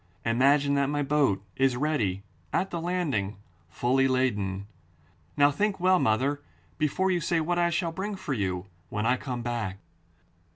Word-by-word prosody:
Imagine 140 +5 +3
that 140 -1 +2
my 145 0 0
boat 135 -9 +2
is 135 -1 +3
ready 115 -10 0 0.3
at 190 - 0
the 170 - -3
landing, 150 - -1 0.3
fully 130 +8 +2
laden. 105 -7 0 0.7
Now 145 0 +6
think 200 +6 0
well, 185 +1 +4
mother, 135 +6 +1 0.4
before 185 +5 +1
you 175 -2 +1
say 165 +1 +1
what 175 +2 0
I 170 0 +3
shall 170 0 -1
bring 200 +5 -4
for 190 -7 -4
you 95 -5 -2 0.2
when 105 +1 -2
I 125 +2 +4
come 125 -2 -5
back. 115 -5 -3
140 Hz, 160 wpm, -27 LUFS, 115-165 Hz, 0.7 s, Now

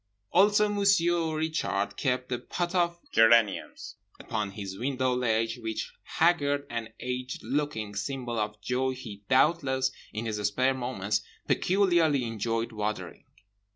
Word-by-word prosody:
Also 205 +3 +5
Monsieur 175 -6 +2
Richard 155 -11 -1
kept 125 -2 -1
a 125 - 0
pot 175 0 -3
of 170 -1 +1
geraniums 115 -3 +3 0.2
upon 105 -2 -3
his 100 -2 -6
window 130 0 0
ledge, 115 -1 0
which 110 -2 -4
haggard 145 -4 +1
and 115 -1 -4
aged 125 0 -4
looking 135 -8 -2
symbol 120 +1 -3
of 105 0 -3
joy 130 +4 0
he 110 -6 -9
doubtless 130 -1 +3 0.2
(in 110 +2 -4
his 110 -2 -2
spare 115 +6 +1
moments) 120 -6 -1 0.3
peculiarly 175 -8 +3
enjoyed 115 +1 -2
watering. 105 -1 -4
125 Hz, 125 wpm, -28 LUFS, 110-155 Hz, 0.3 s, Also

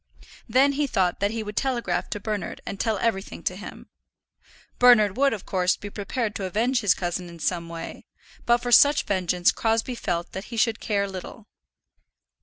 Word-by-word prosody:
Then 265 +5 +4
he 285 +1 0
thought 185 -8 0
that 200 +1 +1
he 225 0 -3
would 210 0 -7
telegraph 235 -10 -1
to 210 - -4
Bernard 210 0 -4
and 200 - -6
tell 220 -3 0
everything 200 -2 -2
to - - -1
him. - - -10 0.9
Bernard 225 -5 +6
would, 275 +2 +3
of 210 -4 -5
course, 185 -1 +1
be 205 - -8
prepared 210 +2 -3
to 195 - -4
avenge 230 +7 +1
his 205 -4 +3
cousin 175 0 -3
in 170 - -11
some 170 +1 -2
way, 165 0 -8 0.4
but 240 0 +5
for 245 - -2
such 285 +4 +6
vengeance 180 -2 +1
Crosbie 225 +2 0
felt 175 -7 -3
that 190 +2 -6
he 235 - -8
should 225 0 +2
care 200 -2 0
little. 190 -2 -8
210 Hz, 185 wpm, -25 LUFS, 185-235 Hz, 0.9 s, Bernard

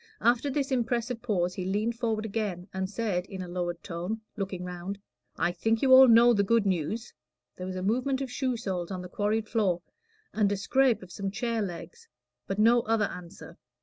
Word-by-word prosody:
After 240 +4 +3
this 275 0 -1
impressive 240 -1 -1
pause 180 -7 0
he 185 - -4
leaned 210 +5 0
forward 220 -2 -1
again, 200 -4 -3
and 190 0 -2
said, 200 -4 -2
in 190 -2 -6
a - - -7
lowered 175 -1 -3
tone, 180 +6 -4
looking 195 -4 -4
round 180 +2 -5 0.4
"I 175 - +1
think 225 +6 0
you 260 -1 +6
all 260 0 +10
know 235 +1 +7
the 205 - +3
good 225 +2 +2
news." 195 +5 -2 0.4
There 185 - -6
was 185 - -4
a 185 - -3
movement 255 +6 +1
of 270 -2 -4
shoe 255 -1 -1
soles 185 -6 -3
on 185 -2 -5
the 180 - -8
quarried 215 +3 -1
floor, 190 -7 0 0.5
and 205 -2 +2
a 205 - 0
scrape 255 +2 +2
of 180 - -13
some 195 +1 -3
chair 225 +3 -2
legs, 210 - -7 0.4
but 195 - -2
no 230 +3 +5
other 225 -2 +1
answer. 180 -2 -9
210 Hz, 200 wpm, -28 LUFS, 185-235 Hz, 0.5 s, all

